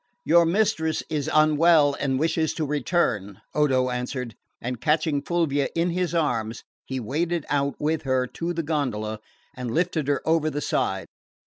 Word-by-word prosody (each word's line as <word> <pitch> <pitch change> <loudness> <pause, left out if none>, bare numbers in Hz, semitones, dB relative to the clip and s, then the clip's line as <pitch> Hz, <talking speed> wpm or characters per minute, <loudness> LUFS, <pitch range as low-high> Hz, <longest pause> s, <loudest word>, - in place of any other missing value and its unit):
"Your 170 +1 +5
mistress 170 -4 +1
is 150 -1 -1
unwell 155 -1 +5
and 135 -2 0
wishes 160 +1 0
to 160 - -1
return," 130 - 0
Odo 130 -4 +2
answered; 125 -1 -4 0.3
and 125 -1 -5
catching 155 -2 +1
Fulvia 145 -4 0
in 170 +1 +1
his 175 0 -1
arms 115 -8 -1 0.2
he 130 -1 -3
waded 160 +7 -1
out 140 -1 0
with 155 +1 0
her 130 -3 +1
to 170 +7 -4
the 170 -1 -2
gondola 110 -9 -2 0.4
and 125 -2 -4
lifted 160 +1 0
her 145 +1 -1
over 160 -1 +3
the 145 - -3
side. - - -1
150 Hz, 155 wpm, -25 LUFS, 130-165 Hz, 0.4 s, Your